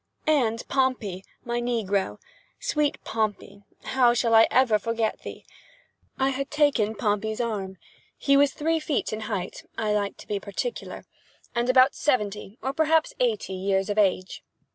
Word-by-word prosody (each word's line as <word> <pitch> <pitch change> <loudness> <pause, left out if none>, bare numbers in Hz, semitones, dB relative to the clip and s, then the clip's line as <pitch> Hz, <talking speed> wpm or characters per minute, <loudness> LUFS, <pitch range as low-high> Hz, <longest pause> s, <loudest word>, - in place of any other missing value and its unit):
And 245 -7 +1
Pompey, 250 -9 0 0.2
my 240 0 -1
negro!—sweet 240 - -2
Pompey! 205 -2 -3 0.2
how 245 -2 +3
shall 230 -1 +1
I 225 0 +7
ever 245 -5 +3
forget 230 0 -1
thee? - - -9 0.7
I 265 0 +2
had 275 +1 -3
taken 280 -8 +2
Pompey's 215 0 -1
arm. 200 -5 -3 0.4
He 280 - +3
was 280 0 +5
three 320 +3 0
feet 300 -7 -2
in 215 - -3
height 190 -4 -4
(I 215 -2 0
like 205 -1 -1
to - - -13
be 205 -1 -2
particular) 215 - -5 0.5
and 240 +1 0
about 255 +1 +6
seventy, 210 -6 -1
or 265 - -1
perhaps 320 - +2
eighty, 460 - 0
years 195 +1 0
of 210 - 0
age. 185 -2 0
230 Hz, 145 wpm, -26 LUFS, 205-275 Hz, 0.7 s, I